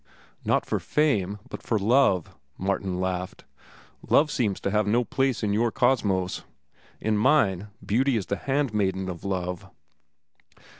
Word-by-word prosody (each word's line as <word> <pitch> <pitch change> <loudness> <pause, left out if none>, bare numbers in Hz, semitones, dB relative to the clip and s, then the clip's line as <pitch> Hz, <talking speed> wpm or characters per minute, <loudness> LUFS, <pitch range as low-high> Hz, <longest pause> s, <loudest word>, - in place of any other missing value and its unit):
"Not - - +1
for - - -1
fame, 105 -11 +1
but - - -8
for 115 - 0
love," 105 - +3 0.2
Martin 95 -1 -1
laughed. 95 0 -3 0.6
"Love 150 +1 +4
seems 105 -9 0
to 100 - -1
have 105 0 +1
no 120 +4 +3
place 130 -1 0
in 105 -1 +1
your 115 +2 +2
Cosmos; 95 -9 +1 0.6
in 110 -1 0
mine, 105 - +3 0.2
Beauty 125 +4 +2
is 100 - -2
the 100 - -2
handmaiden 105 -9 0
of 85 -2 -7
Love." 95 -1 -3
105 Hz, 140 wpm, -26 LUFS, 95-120 Hz, 0.6 s, Love